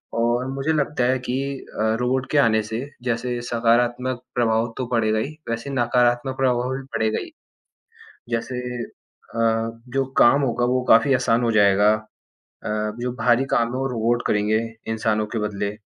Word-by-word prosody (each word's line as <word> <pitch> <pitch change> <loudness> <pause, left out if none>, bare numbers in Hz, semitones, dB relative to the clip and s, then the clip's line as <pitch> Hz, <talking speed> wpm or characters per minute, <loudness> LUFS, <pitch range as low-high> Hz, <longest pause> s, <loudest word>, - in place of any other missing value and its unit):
और 120 +2 +1
मुझे 135 +4 -1
लगता 150 -3 0
है 130 +2 +2
कि 125 0 -3 0.4
अ, 110 +1 +2
रोबोट 130 +2 0
के 150 - +2
आने 115 -5 +4
से 110 +2 -4 0.2
जैसे 120 0 -2
सकारात्मक 120 +2 +1
प्रभाव 115 -1 +1
तो 130 - -2
पड़ेगा 110 -3 +1
ही 145 +7 -4
वैसे 115 +4 -3
नकारात्मक 125 +1 +1
प्रभाव 125 -1 +1
भी 135 - -6
पड़ेगा 110 -1 0
ही। 335 - -8 1.0
जैसे 120 +2 -2 0.2
अ, 115 0 -3
जो 135 +2 0
काम 140 +4 +6
होगा 120 -2 0
वो 125 +1 +1
काफ़ी 115 +5 +6
आसान 120 -1 +1
हो 115 - +2
जाएगा। 105 0 +5
अ, 110 0 -9 0.7
जो 125 +1 -2
भारी 125 +2 +3
काम 115 -1 +2
हो 130 +1 -1
रोबोट 120 0 0
करेंगे 105 +1 +2 0.3
इंसानों 110 -1 0
के - - 0
बदले 105 -1 -3
120 Hz, 160 wpm, -22 LUFS, 115-125 Hz, 1.0 s, काम